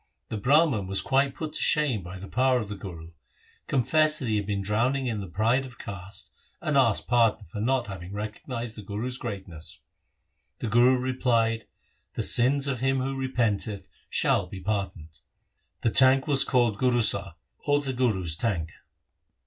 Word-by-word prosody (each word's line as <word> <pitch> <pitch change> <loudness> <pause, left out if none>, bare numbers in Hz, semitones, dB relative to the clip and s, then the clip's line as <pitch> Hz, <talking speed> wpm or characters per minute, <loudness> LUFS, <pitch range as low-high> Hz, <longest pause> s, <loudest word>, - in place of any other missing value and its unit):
The 110 - -3
Brah 150 +10 +4
man 105 -10 -2
was 95 0 +1
quite 135 0 +1
put 155 -2 -5
to - - -1
shame 140 -9 +2
by 90 +2 -9
the 95 +2 -9
power 130 +2 +2
of 105 -3 -5
the 105 - -5
Guru, 85 -4 -9 0.6
confessed 155 +4 +3
that 125 - -3
he 110 - +1
had 100 -1 -3
been 100 -2 -2
drowning 120 +7 0
in 115 -4 -2
the 95 - -7
pride 110 +9 +1
of 125 -3 -11
caste, 100 -2 -6 0.3
and 150 - -2
asked 125 -6 +3
pardon 115 -3 +2
for 105 +6 -7
not 125 +2 +1
having 95 -2 -8
recognized 110 +3 -5
the 105 - -8
Guru's 110 +6 -4
greatness. 95 -8 -7 0.8
The 115 - -4
Guru 120 +4 +5
replied, 120 -3 0 0.2
' - - -40
The - - -1
sins 135 +3 +4
of 130 -3 -2
him 135 +1 +1
who 135 +1 -2
repenteth 115 -6 -2 0.2
shall - - +1
be 95 - -8
par 100 0 -1
doned.' 80 -2 -14 0.6
The 115 - +1
tank 130 +2 +5
was 140 -3 +5
called 120 -5 +1
Gurusar, 120 -3 +2 0.3
or 145 0 +3
the 135 -2 -3
Guru's 100 -10 0
tank. 85 -6 -2
115 Hz, 180 wpm, -26 LUFS, 100-130 Hz, 0.8 s, Guru